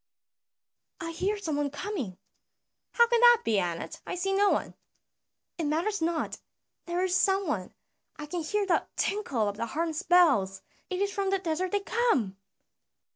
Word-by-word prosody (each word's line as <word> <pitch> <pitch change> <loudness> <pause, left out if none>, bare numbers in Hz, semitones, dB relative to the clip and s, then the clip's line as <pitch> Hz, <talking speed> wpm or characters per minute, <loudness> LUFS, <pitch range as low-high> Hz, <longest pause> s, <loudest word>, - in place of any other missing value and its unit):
"I 330 0 -4
hear 390 +5 -1
some 320 -8 -3
one 290 -1 0
coming." 280 - -5 0.8
"How 470 - +6
can 475 0 +2
that 480 -1 +7
be, 215 -3 +2
Anat? 175 -2 -4
I - - -3
see 390 +2 -1
no 405 +1 +4
one." - - 0 0.9
"It 325 - -1
matters 335 +7 0
not, 330 0 -1 0.5
there 350 +1 0
is 370 -1 +1
some 390 0 +3
one; 200 - -3 0.4
I 300 - -7
can 345 +3 -4
hear 410 +6 0
the 365 - +1
tinkle 275 - 0
of 200 0 -3
the 230 - -2
harness 315 +5 -2
bells, 280 - +3 0.3
it 370 +1 0
is 400 - -1
from 395 -1 -1
the 390 - +2
desert 360 0 -2
they 410 - +1
come." 395 - +1
345 Hz, 170 wpm, -28 LUFS, 290-400 Hz, 0.9 s, that